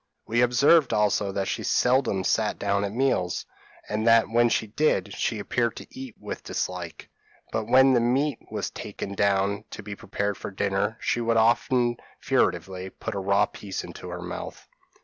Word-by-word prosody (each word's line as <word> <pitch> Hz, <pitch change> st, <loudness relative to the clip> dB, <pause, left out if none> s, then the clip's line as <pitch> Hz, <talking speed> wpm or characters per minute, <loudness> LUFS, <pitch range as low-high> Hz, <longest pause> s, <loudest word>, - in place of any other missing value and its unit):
We 120 Hz, +2 st, +1 dB
observed 140 Hz, +5 st, +4 dB
also 105 Hz, -1 st, +2 dB
that 95 Hz, 0 st, -1 dB
she -, -, -2 dB
seldom 125 Hz, -7 st, +2 dB
sat 110 Hz, +2 st, +1 dB
down 100 Hz, 0 st, 0 dB
to 100 Hz, -, -1 dB
meals, 105 Hz, -6 st, 0 dB, 0.4 s
and 110 Hz, +2 st, -1 dB
that 115 Hz, 0 st, +6 dB
when 120 Hz, +1 st, +3 dB
she 110 Hz, -, +1 dB
did 105 Hz, -4 st, 0 dB
she 115 Hz, -, -1 dB
appeared 115 Hz, +3 st, -1 dB
to -, -, -9 dB
eat 130 Hz, -3 st, -9 dB
with -, -, -7 dB
dislike; 90 Hz, -3 st, -5 dB, 0.4 s
but 110 Hz, -, -1 dB
when 130 Hz, +2 st, +6 dB
the 120 Hz, -, +4 dB
meat 130 Hz, +3 st, +1 dB
was -, -, -3 dB
taken 100 Hz, -, -6 dB
down 100 Hz, +1 st, +1 dB
to 105 Hz, -, -8 dB
be 105 Hz, 0 st, -6 dB
prepared 100 Hz, 0 st, -3 dB
for -, -, -6 dB
dinner, 100 Hz, +2 st, -1 dB
she 120 Hz, -, 0 dB
would 115 Hz, 0 st, +1 dB
often 120 Hz, +1 st, +3 dB, 0.2 s
furtively 95 Hz, 0 st, 0 dB
put -, -, -6 dB
a 100 Hz, -, -3 dB
raw 100 Hz, +1 st, +3 dB
piece 100 Hz, -2 st, -6 dB
into -, -, -9 dB
her -, -, -6 dB
mouth. -, -, -7 dB
110 Hz, 175 wpm, -26 LUFS, 100-120 Hz, 0.4 s, that